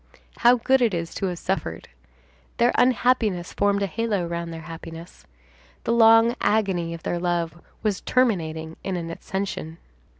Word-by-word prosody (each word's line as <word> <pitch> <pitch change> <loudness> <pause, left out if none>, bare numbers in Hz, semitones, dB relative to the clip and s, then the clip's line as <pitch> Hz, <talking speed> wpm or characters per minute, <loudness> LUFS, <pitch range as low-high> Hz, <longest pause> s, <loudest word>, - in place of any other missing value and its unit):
How 240 +1 +6
good 260 +2 +2
it 225 -6 +2
is 170 0 -4
to 195 - -2
have 180 -1 -3
suffered! 165 - -3 0.7
Their 240 +1 +4
unhappiness 230 -7 +2
formed 200 0 +1
a - - +2
halo 205 -1 -1
round 170 0 -4
their 165 0 -7
happiness. 165 +1 -10 0.6
The 230 - 0
long 225 +1 +6
agony 190 -6 +1
of 165 - -12
their 175 - -2
love 170 -1 -2 0.2
was 210 -3 0
terminating 160 -10 0
in 190 - -2
an 165 -1 -5
ascension. 170 -3 -5
185 Hz, 155 wpm, -24 LUFS, 170-225 Hz, 0.7 s, How